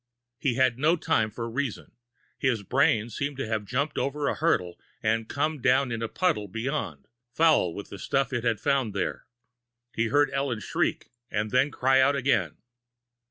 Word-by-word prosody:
He 130 Hz, -4 st, 0 dB
had 130 Hz, -2 st, +2 dB
no 155 Hz, +4 st, +4 dB
time 160 Hz, -10 st, +1 dB
for 115 Hz, +2 st, -5 dB
reason. 125 Hz, 0 st, -4 dB, 0.5 s
His 120 Hz, -6 st, 0 dB
brain 115 Hz, -1 st, +2 dB
seemed 140 Hz, +4 st, -3 dB
to 135 Hz, -, -2 dB
have 110 Hz, -2 st, -2 dB
jumped 140 Hz, +6 st, -1 dB
over 145 Hz, +1 st, -1 dB
a -, -, +1 dB
hurdle 90 Hz, -, 0 dB, 0.2 s
and 110 Hz, 0 st, 0 dB
come 150 Hz, 0 st, -1 dB
down 130 Hz, 0 st, +3 dB
in 115 Hz, -1 st, -3 dB
a 115 Hz, -, -1 dB
puddle 160 Hz, -, 0 dB
beyond, 115 Hz, -, -4 dB, 0.3 s
foul 160 Hz, -, +4 dB
with 100 Hz, -, -7 dB
the 100 Hz, -, -8 dB
stuff 135 Hz, -1 st, 0 dB
it 120 Hz, -2 st, -1 dB
had 115 Hz, -3 st, +1 dB
found 130 Hz, -7 st, 0 dB
there. 100 Hz, -, -3 dB, 0.7 s
He 115 Hz, +1 st, 0 dB
heard 145 Hz, +3 st, +3 dB
Ellen 135 Hz, -4 st, -1 dB
shriek, -, -, -2 dB, 0.2 s
and 105 Hz, 0 st, -2 dB
then 130 Hz, +3 st, +3 dB
cry 130 Hz, -1 st, +3 dB
out 140 Hz, +2 st, +4 dB
again. 125 Hz, -, +1 dB
125 Hz, 175 wpm, -27 LUFS, 110-140 Hz, 0.7 s, no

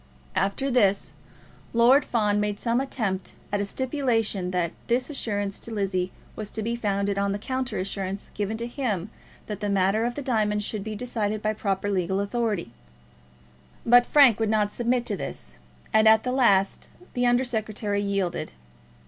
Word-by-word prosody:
After 200 Hz, +9 st, 0 dB
this, 205 Hz, -5 st, +2 dB, 0.6 s
Lord 245 Hz, +5 st, +6 dB
Fawn 210 Hz, -3 st, +1 dB
made 210 Hz, -1 st, -1 dB
some 235 Hz, +2 st, +1 dB
attempt 215 Hz, -8 st, -3 dB, 0.2 s
at 205 Hz, 0 st, 0 dB
a -, -, 0 dB
stipulation 230 Hz, -6 st, 0 dB
that 180 Hz, -2 st, 0 dB, 0.2 s
this 250 Hz, +4 st, +1 dB
assurance 205 Hz, -7 st, -2 dB
to 230 Hz, -, -9 dB
Lizzie 190 Hz, -3 st, -1 dB, 0.2 s
was 215 Hz, -2 st, -5 dB
to 220 Hz, -, -4 dB
be 235 Hz, +2 st, -1 dB
founded 200 Hz, -3 st, -1 dB
on 200 Hz, 0 st, +1 dB
the -, -, -2 dB
counter 260 Hz, +4 st, -3 dB
assurance 195 Hz, +1 st, -3 dB
given 210 Hz, +2 st, -2 dB
to 235 Hz, -, -3 dB
him 225 Hz, -, -2 dB, 0.3 s
that 210 Hz, -2 st, -5 dB
the 205 Hz, -1 st, -2 dB
matter 200 Hz, +2 st, +2 dB
of 240 Hz, 0 st, -2 dB
the 290 Hz, -, -4 dB
diamonds 210 Hz, -5 st, +1 dB
should 210 Hz, -2 st, -3 dB
be 215 Hz, 0 st, -5 dB
decided 215 Hz, -2 st, -2 dB
by 215 Hz, 0 st, +1 dB
proper 200 Hz, -2 st, -2 dB
legal 190 Hz, -1 st, 0 dB
authority; 200 Hz, -, -1 dB, 1.1 s
but 245 Hz, +1 st, +6 dB
Frank 270 Hz, -7 st, +6 dB
would 220 Hz, -1 st, +1 dB
not 210 Hz, -1 st, +2 dB
submit 240 Hz, +1 st, 0 dB
to 210 Hz, -, -2 dB
this, 60 Hz, -, -6 dB, 0.4 s
and 220 Hz, 0 st, +5 dB
at 220 Hz, +1 st, +6 dB
last 235 Hz, -7 st, +2 dB, 0.2 s
the 245 Hz, 0 st, +1 dB
Under 245 Hz, +1 st, +3 dB
Secretary 215 Hz, -4 st, -1 dB
yielded. 200 Hz, -, -2 dB
210 Hz, 165 wpm, -26 LUFS, 200-240 Hz, 1.1 s, Lord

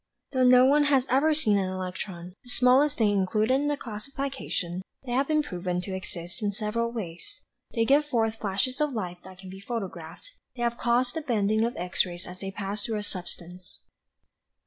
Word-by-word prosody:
"Though 260 Hz, -2 st, +2 dB
no 250 Hz, 0 st, +8 dB
one 290 Hz, +2 st, +5 dB
has 275 Hz, -3 st, +3 dB
even 305 Hz, +3 st, +4 dB
seen 215 Hz, -9 st, +3 dB
an 190 Hz, -1 st, -1 dB
electron, 180 Hz, -1 st, -5 dB
the 245 Hz, -, -13 dB
smallest 255 Hz, +4 st, +4 dB
thing 215 Hz, -3 st, +3 dB
included 210 Hz, +5 st, +2 dB
in 280 Hz, +2 st, +2 dB
the 290 Hz, 0 st, 0 dB
classification, 225 Hz, -7 st, -4 dB, 0.2 s
they 245 Hz, -, -5 dB
have 270 Hz, +3 st, +2 dB
been 305 Hz, -1 st, +2 dB
proved 180 Hz, -6 st, -3 dB
to 190 Hz, -, -4 dB
exist 175 Hz, +1 st, -7 dB
in 205 Hz, -1 st, +1 dB
several 230 Hz, +3 st, -1 dB
ways. 220 Hz, -, -7 dB, 0.4 s
They 230 Hz, -1 st, +3 dB
give 285 Hz, +4 st, +4 dB
forth 225 Hz, -5 st, 0 dB
flashes 215 Hz, +8 st, -1 dB
of 300 Hz, -2 st, +1 dB
light 180 Hz, -6 st, -4 dB
that 190 Hz, -1 st, -12 dB
can 185 Hz, 0 st, -10 dB
be 190 Hz, -, -9 dB
photographed. 195 Hz, -, -6 dB, 0.2 s
They 240 Hz, -, -3 dB
have 235 Hz, 0 st, 0 dB
caused 245 Hz, +1 st, +2 dB
the 320 Hz, -, -3 dB
bending 220 Hz, -5 st, +1 dB
of 235 Hz, +1 st, -1 dB
X 180 Hz, +2 st, +1 dB
rays 175 Hz, 0 st, -7 dB
as 180 Hz, +1 st, -9 dB
they 195 Hz, -, -4 dB
pass 200 Hz, +1 st, -4 dB
through 225 Hz, -2 st, -2 dB
a 210 Hz, -, -3 dB
substance." 180 Hz, -1 st, -7 dB
215 Hz, 195 wpm, -27 LUFS, 185-255 Hz, 0.4 s, no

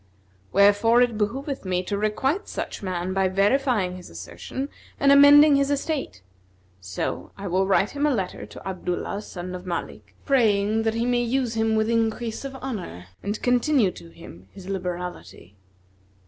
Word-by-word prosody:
Wherefore 205 Hz, +5 st, +5 dB
it 240 Hz, -2 st, -1 dB
behoveth 265 Hz, +7 st, -2 dB
me 185 Hz, -1 st, -1 dB
to 200 Hz, -, -3 dB
requite 265 Hz, -, -1 dB
such -, -, -5 dB
man 185 Hz, -1 st, -3 dB
by 190 Hz, 0 st, +2 dB
verifying 200 Hz, 0 st, +1 dB
his 180 Hz, -, -11 dB
assertion 90 Hz, -, -6 dB, 0.3 s
and 280 Hz, 0 st, +4 dB
amending 285 Hz, +1 st, +8 dB
his 280 Hz, 0 st, +1 dB
estate; 280 Hz, -, -3 dB, 0.6 s
so 95 Hz, -1 st, -4 dB
I 200 Hz, -, -7 dB
will 190 Hz, +1 st, +1 dB
write 195 Hz, +1 st, +2 dB
him 290 Hz, +1 st, 0 dB
a 285 Hz, -, +2 dB
letter 190 Hz, -4 st, -4 dB
to -, -, -11 dB
Abdullah 185 Hz, +1 st, -3 dB
son 180 Hz, -3 st, -7 dB
of 180 Hz, 0 st, -8 dB
Malik, 105 Hz, -, -6 dB
praying 220 Hz, -4 st, +2 dB
that 225 Hz, 0 st, +1 dB
he 230 Hz, +1 st, 0 dB
may 245 Hz, 0 st, +2 dB
use 240 Hz, 0 st, 0 dB
him 225 Hz, -1 st, +1 dB
with 220 Hz, 0 st, +1 dB
increase 230 Hz, 0 st, -1 dB
of 275 Hz, -1 st, -6 dB
honour 185 Hz, -, -6 dB
and 205 Hz, +2 st, -3 dB
continue 245 Hz, -3 st, +3 dB
to 85 Hz, -, -13 dB
him 85 Hz, +2 st, -14 dB
his 190 Hz, -2 st, -11 dB
liberality." 180 Hz, -, -6 dB
210 Hz, 160 wpm, -24 LUFS, 180-250 Hz, 0.6 s, amending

